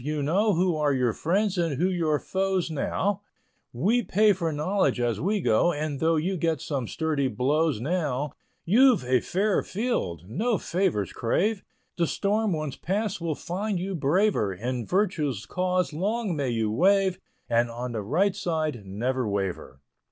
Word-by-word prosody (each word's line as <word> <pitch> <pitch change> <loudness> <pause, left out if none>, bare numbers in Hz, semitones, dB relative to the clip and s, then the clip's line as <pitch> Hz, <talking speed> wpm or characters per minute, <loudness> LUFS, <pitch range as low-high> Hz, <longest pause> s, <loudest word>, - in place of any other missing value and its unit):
You 150 0 -2
know 200 +8 +2
Who 180 0 +2
are 150 -2 +2
your 125 -3 +1
friends 190 - 0
and 165 -4 0
who 175 +6 +2
your 165 -5 +1
foes 190 0 -1
now; 195 +6 -1 0.5
We 205 - +2
pay 210 +1 +3
for 170 -3 -2
knowledge 150 -2 0
as 120 -3 0
we 200 +4 0
go; 135 +6 +3
And 145 -2 -3
though 165 +2 +2
you 180 +5 0
get 160 -2 0
some 135 -5 -3
sturdy 155 -4 -1
blows 140 +1 +1
now, 145 -1 -1 0.3
You've 240 - +5
a 125 0 +3
fair 195 - 0
field, 185 - -2
no 215 - 0
favors 175 - -1
crave, 195 - 0 0.3
The 170 -1 +2
storm 210 +4 0
once 155 -5 -3
passed 200 0 -2
will 165 -3 -1
find 195 +6 -3
you 190 +2 -3
braver, 165 - +2
In 120 +5 -4
virtue's 160 - 0
cause 180 -2 0
long 200 +3 -1
may 140 -3 -1
you 115 -2 0
wave, 190 - +3 0.3
And 120 0 +2
on 120 +2 -5
the 110 -2 -3
right 180 - +1
side, 155 - -2
never 115 +5 -2
waver. 95 -9 -3
160 Hz, 165 wpm, -26 LUFS, 130-195 Hz, 0.5 s, You've